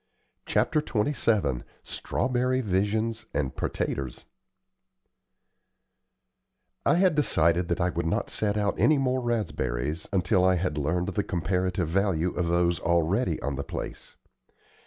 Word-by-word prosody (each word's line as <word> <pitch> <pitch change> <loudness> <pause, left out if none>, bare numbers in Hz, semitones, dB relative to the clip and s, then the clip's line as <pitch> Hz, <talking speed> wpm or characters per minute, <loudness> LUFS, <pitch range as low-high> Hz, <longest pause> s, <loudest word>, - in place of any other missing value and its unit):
CHAPTER 155 - +2
XXVII 110 - 0 0.2
STRAWBERRY 125 0 -1
VISIONS 110 +2 -1
AND 70 -3 -1
"PERTATERS" 65 -3 -3 2.6
I - - +4
had 180 -1 +4
decided 85 - +2
that 85 - -1
I 90 +1 +1
would 85 -1 -2
not - - -1
set 105 -1 0
out 105 -1 +1
any 155 - +5
more 130 -1 +1
raspberries 80 - -2
until 90 -1 +2
I 95 0 +4
had 85 -4 -1
learned 90 +6 0
the 100 +1 0
comparative 90 0 -1
value 90 -1 +1
of 90 -1 -1
those 85 0 +2
already 85 +3 +1
on 70 -1 -2
the 70 - -2
place. - - -7
90 Hz, 125 wpm, -27 LUFS, 85-110 Hz, 2.6 s, any